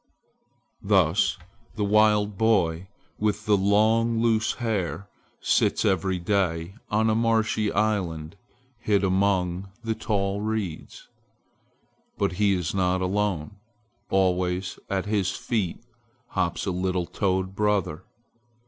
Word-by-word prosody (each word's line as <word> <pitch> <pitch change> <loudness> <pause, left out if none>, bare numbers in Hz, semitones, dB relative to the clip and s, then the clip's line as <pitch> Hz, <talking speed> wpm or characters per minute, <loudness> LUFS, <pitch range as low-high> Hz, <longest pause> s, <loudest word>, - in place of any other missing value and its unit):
Thus 95 -2 +2 0.4
the 105 - -1
wild 105 0 +3
boy 95 -5 +1 0.3
with 105 0 -1
the 105 -2 +4
long, 110 +4 +3
loose 110 -1 +2
hair 100 -5 -2 0.3
sits - - +2
every 95 0 +1
day 90 -2 -1 0.2
on 110 +1 +2
a 110 - +3
marshy 110 -2 +1
island 90 -7 -1 0.4
hid 105 -3 +1
among 95 -1 +1
the 115 -1 -1
tall 100 -3 -1
reeds. 105 -6 -4 1.1
But - - +1
he 100 +2 +2
is 90 -4 -2
not 95 -1 +1
alone. 100 -1 -1 0.5
Always 90 0 0
at 95 -1 -1
his 100 -3 0
feet 105 +1 -3 0.4
hops 85 -1 -1
a 95 - -1
little 90 0 -1
toad 95 0 -1
brother. 100 -5 0
100 Hz, 110 wpm, -25 LUFS, 90-105 Hz, 1.1 s, the